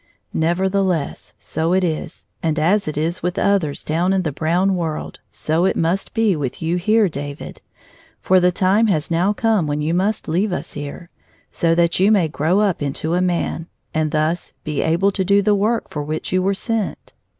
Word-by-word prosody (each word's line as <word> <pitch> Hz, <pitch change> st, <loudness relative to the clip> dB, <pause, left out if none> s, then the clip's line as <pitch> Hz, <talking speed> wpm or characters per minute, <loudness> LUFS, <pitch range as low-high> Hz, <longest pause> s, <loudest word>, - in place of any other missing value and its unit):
Nevertheless, 180 Hz, -1 st, 0 dB
so 165 Hz, +2 st, -2 dB
it 190 Hz, 0 st, +2 dB
is, 160 Hz, 0 st, -3 dB, 0.2 s
and 160 Hz, -1 st, 0 dB
as 185 Hz, +6 st, +2 dB
it 155 Hz, -, -3 dB
is 165 Hz, +4 st, -1 dB
with 180 Hz, +1 st, -2 dB
others 185 Hz, -8 st, +1 dB
down 170 Hz, +5 st, +1 dB
in 190 Hz, -1 st, +1 dB
the 155 Hz, -, -1 dB
brown 175 Hz, +7 st, +1 dB
world, 165 Hz, -3 st, -4 dB
so 160 Hz, +3 st, -1 dB
it -, -, +1 dB
must 170 Hz, +7 st, -1 dB
be 220 Hz, -4 st, +3 dB
with 140 Hz, -5 st, -4 dB
you 165 Hz, +2 st, -1 dB
here, 215 Hz, +4 st, +3 dB
David. 145 Hz, -2 st, -7 dB, 0.6 s
For 185 Hz, 0 st, +4 dB
the 180 Hz, 0 st, +3 dB
time 195 Hz, +5 st, +3 dB
has 160 Hz, -5 st, 0 dB
now 175 Hz, +4 st, +2 dB
come 220 Hz, -6 st, +1 dB
when 145 Hz, 0 st, -1 dB
you 155 Hz, +2 st, -1 dB
must 195 Hz, +4 st, 0 dB
leave 185 Hz, +6 st, 0 dB
us 180 Hz, -, -4 dB
here, 145 Hz, +4 st, -7 dB, 0.4 s
so 165 Hz, -1 st, +1 dB
that 170 Hz, 0 st, +2 dB
you 195 Hz, +3 st, +4 dB
may 195 Hz, -6 st, +4 dB
grow 160 Hz, +6 st, +1 dB
up 200 Hz, -6 st, +1 dB
into 145 Hz, +3 st, -2 dB
a 180 Hz, -, +2 dB
man, 175 Hz, -2 st, -1 dB, 0.3 s
and 155 Hz, -1 st, 0 dB
thus 155 Hz, +3 st, -1 dB
be 150 Hz, -2 st, -2 dB
able 175 Hz, +5 st, +2 dB
to 190 Hz, -1 st, -1 dB
do 200 Hz, +2 st, +4 dB
the 210 Hz, +1 st, +3 dB
work 215 Hz, +3 st, 0 dB
for 150 Hz, -, -3 dB
which 155 Hz, +2 st, -4 dB
you 185 Hz, -, +3 dB
were 195 Hz, +1 st, +1 dB
sent." 225 Hz, 0 st, -3 dB
175 Hz, 195 wpm, -20 LUFS, 155-195 Hz, 0.6 s, For